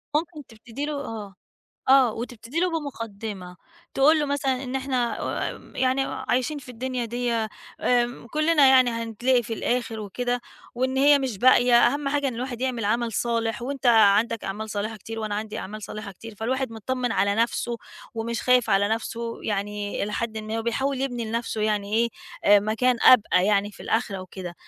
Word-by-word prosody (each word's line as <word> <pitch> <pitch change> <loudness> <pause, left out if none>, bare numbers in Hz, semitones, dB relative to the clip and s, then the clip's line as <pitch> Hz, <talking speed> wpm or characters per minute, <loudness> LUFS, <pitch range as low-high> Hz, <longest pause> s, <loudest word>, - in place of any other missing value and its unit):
ممكن 315 -2 -2
تبتدي 230 +5 -7
له 300 - -3
آه، 205 -4 -7 0.5
آه 260 -4 +6
وتبتدي 240 +6 -5
له 365 0 +2
بمقدّمة، 210 - -7 0.4
تقول 305 +4 +5
له 295 - 0
مثلًا 270 -2 -1
إن 255 +1 -3
إحنا 255 -3 -1 0.3
آمم، - - -13
يعني 260 +1 +2
عايشين 255 +4 -1
في 255 -2 -13
الدنيا 250 0 -3
دِيّة 235 -1 -1 0.3
آمم، 240 -1 +1
كلّنا 305 +2 +3
يعني 255 -2 +6
هنتلاقي 230 +2 0
في 225 - -6
الآخِر 235 -1 -2
وكده 245 +4 -2 0.3
وإن 260 +2 -1
هي 285 +1 +6
مش 255 -7 -3
باقية، 245 0 +5
أهم 275 +4 +2
حاجة 285 0 0
إن 250 - -5
الواحد 245 0 -5
يعمل 250 -4 -1
عمل 230 +2 0
صالح 230 0 -1
وأنت 270 0 -3
عَندك 225 0 +4
أعمال 210 +3 -4
صالحة 215 +2 -3
كتير 225 +3 -8
وأنا 215 -2 -3
عندي 215 0 -4
أعمال 215 +2 -7
صالحة 210 -1 -7
كتير، 225 +3 -11
فالواحد 255 +4 -2
مطّمن 245 +2 -2
على 200 +1 +2
نفسه 235 +1 0 0.4
ومش 230 0 -3
خايف 250 -3 +3
على 200 +1 +3
نفسه 230 +1 -3
يعني 205 0 -2
إلى 210 +1 -2
حدٍ 220 -1 -3
ما 215 +1 -4
وبيحاول 260 +4 -1
يبني 245 -4 -2
لنفسه 225 0 -3
يعني 210 -1 0
إيه، 235 +1 +3 0.4
آآ 205 0 +7
مكان 230 +4 +1
أبقى 200 -6 +6
يعني 205 0 +2
في - - -15
الآخرة 215 -4 -1
وكده، 180 -1 -8
235 Hz, 175 wpm, -25 LUFS, 215-255 Hz, 0.5 s, آآ